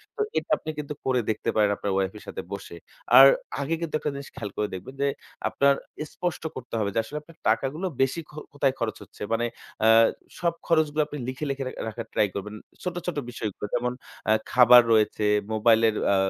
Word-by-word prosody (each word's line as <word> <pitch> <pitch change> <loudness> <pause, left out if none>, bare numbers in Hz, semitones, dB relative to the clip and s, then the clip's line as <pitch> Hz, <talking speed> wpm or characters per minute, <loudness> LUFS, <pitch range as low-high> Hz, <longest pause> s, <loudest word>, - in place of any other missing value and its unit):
তো 430 - -2 0.2
এটা - - -2
আপনি - - -8
কিন্তু 150 0 -4
করে 130 -1 +2
দেখতে 110 +1 -1
পারেন 105 -1 +4
আপনার 100 - -2
wife 95 +1 -1
এর - - -12
সাথে - - -5
বসে। - - -7 0.4
আর 135 +1 +12 0.3
আগে 145 +4 -1
কিন্তু 165 -2 -2
একটা 150 - -2
জিনিস 140 0 -7
খেয়াল 105 -3 -5
করে 105 - 0
দেখবেন 95 +9 -9
যে, 140 - +3 0.4
আপনার 140 0 +4 0.4
স্পষ্ট 175 -3 -3
করতে 125 -2 -9
হবে 105 -2 0
যে, - - +3
আসলে 145 +7 -7
আপনার 165 +1 -18
টাকাগুলো 135 +10 0 0.2
বেশি 135 +5 +1
খ - - -16 0.2
কোথায় 140 -2 +1
খরচ 115 -2 -1
হচ্ছে? - - -19
মানে 120 +1 +1 0.4
আ - - +6 0.5
সব 170 -1 +1
খরচগুলো 155 -2 +2
আপনি 150 - -7
লিখে, 130 +4 -4
লিখে 135 0 -2
রা - - -4 0.2
রাখার 115 +1 -7
try 105 - +3
করবেন। 105 +2 -5 0.3
ছোট, 180 -1 -3
ছোট 175 - -2
বিষয়গুলো 110 -4 -5
যেমন, 125 +1 0 0.4
আ - - +6 0.2
খাবার 125 -1 +8
রয়েছে, 110 -1 +2 0.3
মোবাইলের 110 0 +4 0.2
আ - - +4
125 Hz, 200 wpm, -26 LUFS, 110-150 Hz, 0.5 s, আর